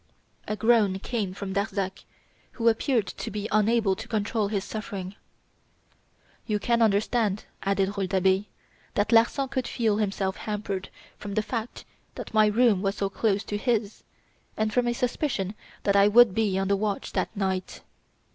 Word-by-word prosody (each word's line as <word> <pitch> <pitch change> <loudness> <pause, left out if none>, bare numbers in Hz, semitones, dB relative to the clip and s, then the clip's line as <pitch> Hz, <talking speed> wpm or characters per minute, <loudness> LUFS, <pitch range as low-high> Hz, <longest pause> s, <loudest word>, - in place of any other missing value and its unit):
A 215 - -1
groan 220 -4 +3
came 205 -1 -3
from 190 0 -6
Darzac, 200 -1 -2 0.5
who 230 -1 -1
appeared 230 -1 +1
to 215 - -6
be 210 0 -4
unable 215 -2 +3
to 220 +3 -8
control 215 -1 0
his 200 -2 -2
suffering. 200 -4 -6 1.3
"You 210 -2 +1
can 235 +3 +1
understand," 215 -1 +1 0.2
added 195 0 0
Rouletabille, 190 0 +1 0.5
"that 205 +2 +1
Larsan 235 +4 +3
would 260 -2 0
feel 220 -3 0
himself 195 -2 -1
hampered 205 -3 -4 0.3
from 200 -1 -6
the 215 - +1
fact 230 +1 -5 0.3
that - - -8
my 215 -1 +5
room 215 -2 +3
was 195 0 0
so 195 -1 -1
close 205 -1 0
to 205 - -3
his, 225 -3 -1 0.5
and 215 0 0
from 245 +1 +2
a 240 - +1
suspicion 235 -5 -1 0.3
that 200 - +2
I 200 0 +6
would 225 -1 +6
be 205 -2 +1
on 195 0 0
the 200 - +3
watch 205 0 -2
that - - -1
night. 190 -2 -2
210 Hz, 160 wpm, -26 LUFS, 195-225 Hz, 1.3 s, I